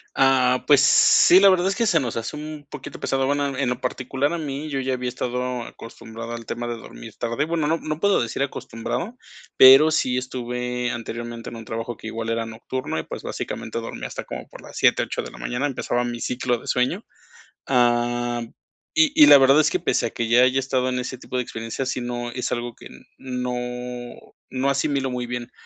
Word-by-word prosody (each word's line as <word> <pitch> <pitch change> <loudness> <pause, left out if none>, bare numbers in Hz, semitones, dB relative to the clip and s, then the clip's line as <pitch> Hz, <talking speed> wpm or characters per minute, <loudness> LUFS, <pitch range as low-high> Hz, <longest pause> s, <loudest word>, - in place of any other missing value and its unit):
Ah. 130 -1 +3
Pues 145 -2 +6
sí, 180 +5 +6
la 195 0 +7
verdad 185 0 +3
es 195 - 0
que 230 - +1
se 165 -6 +4
nos 120 -4 -3
hace 115 +6 -4
un 150 -1 -8
poquito - - -9
pesado. 135 0 0
Bueno, 140 -1 -1
en 135 -3 0
lo 125 - -2
particular 130 +4 -2
a - - -1
mí, 150 0 -5
yo 135 -2 -2
ya 130 0 -1
había 125 0 -3
estado 125 0 -3
acostumbrado 115 0 -9
al 115 -1 -7
tema 120 0 -4
de 120 - -3
dormir 115 -1 -11
tarde, 120 +5 -1
bueno, 160 -2 -1
no, 165 +1 +2
no 155 0 -4
puedo 200 -5 +3
decir 120 +4 -2
acostumbrado, 140 - -5 0.4
pero 135 +4 +9
sí 130 -5 +1
estuve 125 -1 -3
anteriormente 120 0 -6
en - - -9
un 115 -1 -9
trabajo 115 +1 -4
que 110 - -9
igual 115 0 -4
era 115 0 -1
nocturno 115 -3 -4
y, - - -4
pues, - - -8
básicamente, - - -5
dormía - - -6
hasta - - -7
como - - -7
por - - -12
las - - -13
7 - - +4
8 - - -3
de - - -8
la - - -13
mañana. 125 +4 -2
Empezaba 125 -3 -1
mi 120 -1 -4
ciclo 125 0 -1
de - - -14
sueño. 125 0 0 0.6
Ah, 120 -1 +1 0.5
y 310 -2 +5
y 300 -2 +9
la - - +10
verdad 135 +2 +6
es 155 - +4
que, 185 - -1
pese 140 -7 0
a - - -6
que 115 - -3
ya 120 +2 +5
haya 130 +1 +3
estado 130 -1 0
en 125 0 -1
ese 125 +1 -5
tipo 125 - -6
de 125 - 0
experiencias, 115 +4 -5
sí, 125 - -2
no, 120 0 -4
es 125 +1 -3
algo 120 -1 -3
que - - -12 0.3
no 125 -1 -4 1.0
no 135 +1 0
asimilo 140 -1 0
muy 125 -1 -3
bien. 120 0 -5
125 Hz, 215 wpm, -23 LUFS, 120-140 Hz, 1.0 s, la